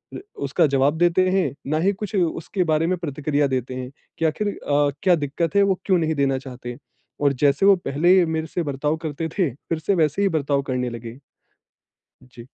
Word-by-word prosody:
अ, - - -4 0.3
उसका 150 +4 +2
जवाब 140 +3 +2
देते 175 +2 +3
हैं, 190 0 +1 0.2
ना 155 +2 0
ही 200 - +4
कुछ 210 +2 -6
उसके 180 +1 0
बारे 160 -1 +1
में 185 - 0
प्रतिक्रिया 145 -2 -1
देते 130 -1 -2
हैं 130 0 -6 0.3
कि 165 - 0
आखिर 160 +7 0
अ, 145 -7 0
क्या 180 -2 +5
दिक्कत 160 +5 -2
है, 200 - +6
वो 195 -2 +1
क्यों 190 -2 +3
नहीं 160 -1 0
देना 135 -1 +1
चाहते। 125 -2 -8 0.4
और 140 -1 +2
जैसे 145 +6 +3
वो 200 - +7
पहले 175 +2 +3
मेरे 160 -1 -2
से 175 +2 -3
बर्ताव 150 +1 -1
करते 155 +2 -3
थे, 175 -7 +2
फिर 160 +2 -4
से 195 +5 0
वैसे 160 +2 +1
ही 200 - +3
बर्ताव 140 -4 0
करने 125 -2 -2
लगे। 115 +1 -8 1.1
जी। 120 -1 -13
155 Hz, 200 wpm, -22 LUFS, 140-175 Hz, 1.1 s, वो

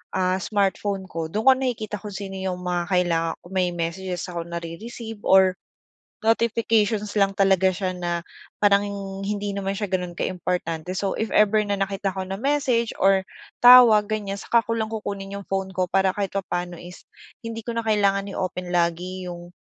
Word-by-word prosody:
ah, 185 0 +1
smartphone 200 -1 -1
ko, 165 -2 -4
dun 215 +2 -1
ko - - +11
nakikita 240 -5 -3
kung 210 0 -8
sino 195 -1 -6
yung 185 -1 -3
mga 180 -1 -1
kailangan, 165 -2 +1
kung 175 - -13
may 180 -1 +2
messages 175 +2 -3
ako 170 -1 -5
nare-receive 205 +7 -7
or 190 -1 +6 0.7
notifications 220 -2 +1
lang 195 0 +3
talaga 190 -1 +3
siya 190 -1 -2
na 175 -1 -2 0.4
parang 200 0 +4 0.4
hindi 205 0 -2
naman 195 0 -2
siya 205 -1 -4
gano'n 180 -2 -2
kaimportante. 180 -1 -3
So, 195 +1 -1
if 220 - -2
ever 215 0 +5
na 205 - 0
nakita 195 0 -2
ko 190 - -3
na 195 +1 -5
message 260 -3 +1
or 195 0 +4 0.4
tawag, 245 -4 +8
ganiyan, 205 -2 -3
saka 235 +3 +2
ko 230 - -2
lang 220 - 0
kukunin 200 -3 -5
yung 200 -1 -7
phone 195 0 -1
ko 185 0 +1
para 190 0 +3
kahit 200 -2 -2
papaano 180 -2 -3
is 175 +1 -11 0.4
hindi 230 0 -6
ko 235 - -3
na 230 - -1
kailangan 200 -2 +2
i-open 180 -1 -3
lagi 175 +2 -1
yung, 175 0 -8
195 Hz, 175 wpm, -24 LUFS, 180-210 Hz, 0.7 s, ko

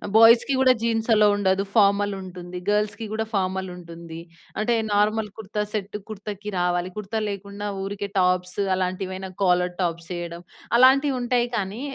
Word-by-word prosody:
బాయ్స్‌కి 230 +4 +7
గూడా 260 -1 +6
జీన్స్ 225 -1 0
అలో 210 -1 +5
ఉండదు. 195 -1 +1
ఫార్మల్ 205 -1 +4
ఉంటుంది. 180 -1 -8
గర్ల్స్‌కి 210 +1 0
గూడా 220 0 -1
ఫార్మల్ 190 -1 -1
ఉంటుంది. 170 -1 -10 0.4
అంటే 235 +2 +1 0.2
నార్మల్ 210 +1 +2
కుర్తా 210 -1 -4
సెట్, 205 -1 -3
కుర్తాకి 210 0 -6
రావాలి. 175 0 0
కుర్తా 210 +1 -3
లేకుండా 200 +1 -6 0.2
ఊరికే 200 +1 -4
టాప్స్ 180 0 +1 0.2
అలాంటివైనా 185 +1 -3
కాలర్ 180 -1 +3
టాప్స్ 170 -1 -2
వేయడం. 170 -1 -6 0.4
అలాంటివి 265 +2 +5
ఉంటాయి 245 0 +1
కానీ 205 +2 -3
200 Hz, 140 wpm, -24 LUFS, 180-220 Hz, 0.4 s, బాయ్స్‌కి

